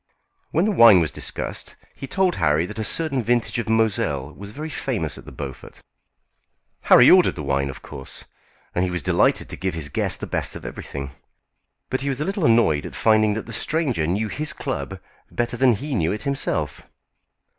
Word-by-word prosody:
When 170 +5 +1
the 215 - +2
wine 115 - +8
was 80 -3 0
discussed - - -4 0.2
he 135 - -8
told 185 +4 +1
Harry 80 -1 +2
that 105 +4 -8
a - - -1
certain 140 +2 +1
vintage 120 0 0
of 115 - -3
Moselle 95 -11 0
was 100 0 -9
very 150 +9 -6
famous - - -2
at - - -12
the - - -10
Beaufort. 70 -3 -8 1.1
Harry 125 - +8
ordered 185 -1 +5
the 75 - -6
wine 70 0 0
of 65 - -9
course, 65 - -8 0.5
and 90 +1 0
was 90 -3 -3
delighted - - +2
to - - -5
give 95 -2 -3
his 75 -3 -3
guest - - -1
the - - -4
best - - -3
of - - -9
everything; 70 -1 -6 0.8
but 130 - 0
he 140 - -1
was 135 -1 -2
a 150 - -1
little 195 -2 -1
annoyed 115 - +3
at - - -10
finding 110 -1 +3
that 110 - -4
the 115 - -8
stranger 130 - 0
knew 100 +6 0
his 150 +7 -3
club - - -4 0.3
better 120 0 -2
than 130 0 +4
he 140 +7 -4
knew 85 -9 +1
it 105 +1 -3
himself. 80 - -1
110 Hz, 195 wpm, -23 LUFS, 80-135 Hz, 1.1 s, wine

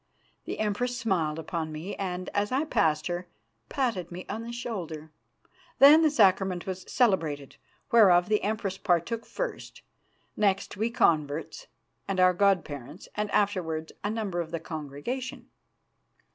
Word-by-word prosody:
The - - -4
Empress 225 +4 -1
smiled 175 -10 0
upon 160 0 -4
me 160 +6 -6
and, 185 -2 -4
as 205 +2 -1
I 265 +3 +2
passed 155 - +1
her, 175 0 -3 0.4
patted 220 - -1
me 180 +1 -7
on 220 - -4
the 230 +1 -6
shoulder. 175 -11 -5 0.7
Then 290 +4 +9
the 315 - +5
Sacrament 190 -8 +3
was 185 -1 -5
celebrated, 160 - +1 0.3
whereof 185 -6 +6
the 210 0 +2
Empress 200 -2 -2
partook 195 +6 0
first; - - -5 0.5
next 195 -2 +1
we 220 +3 0
converts, 160 - 0 0.4
with 190 -1 -1
our 185 0 +6
god 195 0 +3
parents, 145 +3 -9
and 210 0 -2
afterwards 170 -7 0
a 205 - 0
number 210 -5 -2
of 165 - -6
the 165 0 -3
congregation. 160 - -6
190 Hz, 145 wpm, -28 LUFS, 165-220 Hz, 0.7 s, Then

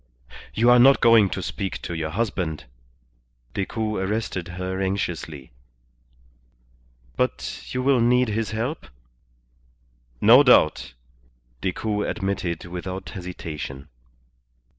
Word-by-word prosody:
"You 120 +2 +4
are 125 - +7
not 135 +3 +7
going 115 -4 +5
to - - -4
speak 95 -1 -4
to 85 - -4
your 80 -1 -3
husband?" 90 - -2 0.9
Decoud 105 +1 -2
arrested 95 -3 -2
her 95 +1 -3
anxiously. 85 -8 -3 1.6
"But - - -3
you 125 0 -2
will 135 -2 +3
need 125 +1 +3
his 110 +1 -2
help?" 115 +8 -4 1.3
"No 120 +6 +8
doubt," 80 - +4 0.7
Decoud 105 +3 -2
admitted 95 -5 -3
without 90 +2 -6
hesitation. 75 -7 -7
95 Hz, 100 wpm, -24 LUFS, 90-115 Hz, 1.6 s, No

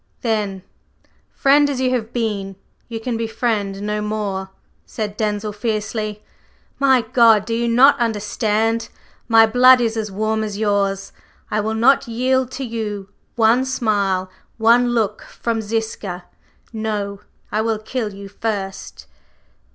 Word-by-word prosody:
"Then, 210 -5 -1 0.7
friend 285 +1 +3
as 275 -3 -2
you 255 -1 +1
have 230 -2 -2
been, 205 -5 -2 0.3
you 230 -1 -5
can 230 0 -3
be 230 0 -2
friend 210 -4 -1
no 210 0 -2
more," 205 -3 -3 0.3
said 210 -2 -5
Denzil 210 -1 -2
fiercely. 215 0 -3 0.6
"My 265 -2 +4
God! 225 -2 +4
Do 230 - -3
you 235 +1 0
not 265 +4 +5
understand? 225 0 0 0.4
My 225 -1 +7
blood 250 +3 +6
is 230 -2 0
as 220 -1 -2
warm 220 +2 -1
as 210 -2 -4
yours, 200 -2 0 0.4
I 215 - +1
will 220 +1 -1
not 245 +5 +4
yield 255 +2 +1
to 270 - -4
you 215 -5 -4 0.3
one 230 +2 +4
smile, 200 -7 0 0.3
one 235 +2 +4
look 215 -3 0
from 230 -1 -3
Ziska! 210 -4 -4 0.5
No! 210 -2 -3 0.3
I 215 - +1
will 225 0 0
kill 215 0 -4
you 200 0 -9
first!" 195 -1 -5
220 Hz, 140 wpm, -20 LUFS, 205-235 Hz, 0.7 s, My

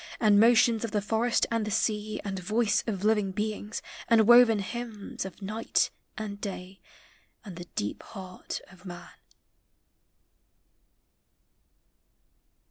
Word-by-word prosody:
And 210 -2 +5
motions 230 0 +5
of 230 - -2
the 210 - 0
forests 225 +3 +1
ami 230 -1 +1
the - - -3
sea 215 0 -1
And 195 -1 -3
voice 215 +3 +1
of 200 -4 -3
living 210 -2 +2
beings, 210 +1 -4 0.2
and 225 -2 +4
woven 240 -2 +7
hymns 215 0 -5
Of 190 +1 -9
night 215 +4 0 0.3
and 205 -2 -6
day, 190 -1 -7 0.6
and 190 -4 -8
the 175 0 -8
deep 105 - -3
heart 185 -3 -8
of 185 -1 -18
man. 175 -2 -9
210 Hz, 125 wpm, -28 LUFS, 195-225 Hz, 0.6 s, woven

